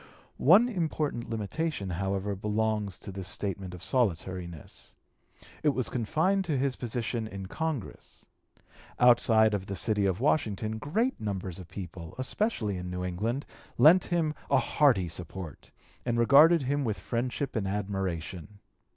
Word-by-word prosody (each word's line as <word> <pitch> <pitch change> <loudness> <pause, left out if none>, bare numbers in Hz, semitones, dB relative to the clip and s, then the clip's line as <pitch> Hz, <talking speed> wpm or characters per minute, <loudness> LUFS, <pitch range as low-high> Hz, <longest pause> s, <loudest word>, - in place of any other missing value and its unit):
One 195 - +6
important 155 - -2
limitation, 115 - -3
however, 95 +3 -2
belongs 105 -1 -1
to - - -8
this 95 -1 -6
statement 95 -1 -3
of 90 - -11
solitariness. 90 - -2 0.7
It 150 -2 +2
was 130 - -1
confined 160 - +1
to 155 -5 0
his 135 0 0
position 120 -1 -3
in 100 -2 -7
Congress. 155 +2 -5 0.7
Outside 115 -3 +5
of 95 -2 -2
the 100 - -4
city 105 -1 +1
of 95 -1 -1
Washington 110 -6 0
great 215 - -1
numbers 95 -4 -4
of 90 - -10
the - - -22
people, 90 -3 -7
especially 130 - -1
in 90 0 -5
New 90 0 -4
England, 110 +10 -2 0.3
lent 160 +9 +7
him 165 -3 0 0.2
a 140 - +4
hearty 130 -10 +3
support 85 -1 -8 0.3
and 120 -1 -1
regarded 145 +7 +6
him 140 +2 0
with 110 -5 -1
friendship 125 +3 -3
and 105 -4 -1
admiration. 95 -2 -4
110 Hz, 140 wpm, -29 LUFS, 95-140 Hz, 0.7 s, lent